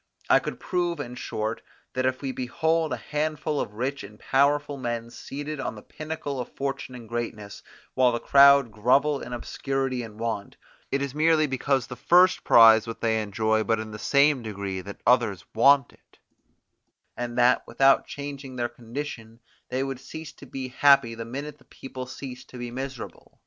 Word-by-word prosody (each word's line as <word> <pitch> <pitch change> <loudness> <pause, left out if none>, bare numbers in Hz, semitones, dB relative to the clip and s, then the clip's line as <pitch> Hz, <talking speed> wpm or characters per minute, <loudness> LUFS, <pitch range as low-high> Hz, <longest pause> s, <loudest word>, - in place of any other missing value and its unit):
I - - +7
could - - -6
prove, 175 -3 -1
in 125 -4 -5
short, 110 -2 -4 0.3
that 130 0 0
if 130 +2 -2
we 135 - -1
behold 160 +6 0
a - - -1
handful 150 0 -2
of 105 - -6
rich 130 +3 -3
and 105 +1 -11
powerful 145 +1 +2
men 120 -3 -4
seated 145 +4 -6
on 120 - -3
the 105 - -11
pinnacle 155 -3 -5
of 125 - -5
fortune 135 -2 -4
and 120 -2 -10
greatness, 110 -3 -5 0.3
while 125 -1 +4
the 120 - -2
crowd 140 -3 +6
grovel 135 +7 +2
in 120 - -8
obscurity 135 +1 -2
and 110 -2 -10
want, 115 -3 -4 0.3
it 140 0 0
is 140 -2 -4
merely 155 +1 +3
because 135 -2 0
the 125 - -8
first 180 +8 +4
prize 115 -1 +7
what 115 - -7
they 110 -1 +1
enjoy 110 +1 0
but 115 0 +1
in 110 0 -6
the 105 - -8
same 140 +2 +3
degree 100 -4 -5
that 100 +2 -10
others 115 -6 +2
want 135 +3 +4
it, - - -27 1.0
and 120 0 -5
that, 125 +1 +4
without 135 +3 +3
changing 140 -2 -7
their 120 -1 -1
condition, 115 -1 -7 0.3
they 130 +1 -1
would 135 -2 -4
cease 160 +3 -9
to 140 - -14
be 130 0 -6
happy 130 -3 +4
the 115 0 -6
minute 140 +5 -7
the - - -23
people 130 -1 -8
ceased 130 -1 -9
to 125 - -10
be 120 -1 -6
miserable. 130 0 -7
130 Hz, 180 wpm, -26 LUFS, 115-140 Hz, 1.0 s, I